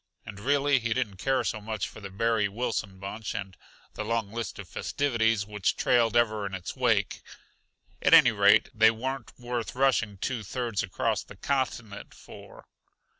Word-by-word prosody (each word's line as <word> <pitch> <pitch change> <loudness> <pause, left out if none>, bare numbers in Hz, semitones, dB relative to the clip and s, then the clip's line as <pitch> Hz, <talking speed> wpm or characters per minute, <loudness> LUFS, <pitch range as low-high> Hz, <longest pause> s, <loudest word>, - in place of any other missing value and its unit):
And 105 -3 -9
really 140 +3 +2
he 120 -1 -1
didn't 110 -7 -2
care 135 +7 +1
so 110 - -2
much 110 -2 -3
for - - -12
the 100 - -7
Barry 110 +1 +1
Wilson 105 -3 -3
bunch 105 +4 -6
and 95 -3 -5 0.4
the - - -4
long 110 -2 -2
list 115 0 -5
of 100 - -8
festivities 115 -6 0
which 105 -2 -1
trailed 120 -2 +3
ever 110 -3 +2
in 95 - -5
its 95 - -6
wake; - - +1 0.8
at - - +3
any 145 -7 +7
rate, 100 0 +4
they 110 -1 +6
weren't 130 +4 -4
worth 120 -1 -4
rushing 125 -6 +2
two 120 +4 -3
thirds 115 0 -2
across 110 +4 -1
the 100 - -14
continent 120 -5 -3
for. - - -13
110 Hz, 170 wpm, -28 LUFS, 100-120 Hz, 0.8 s, any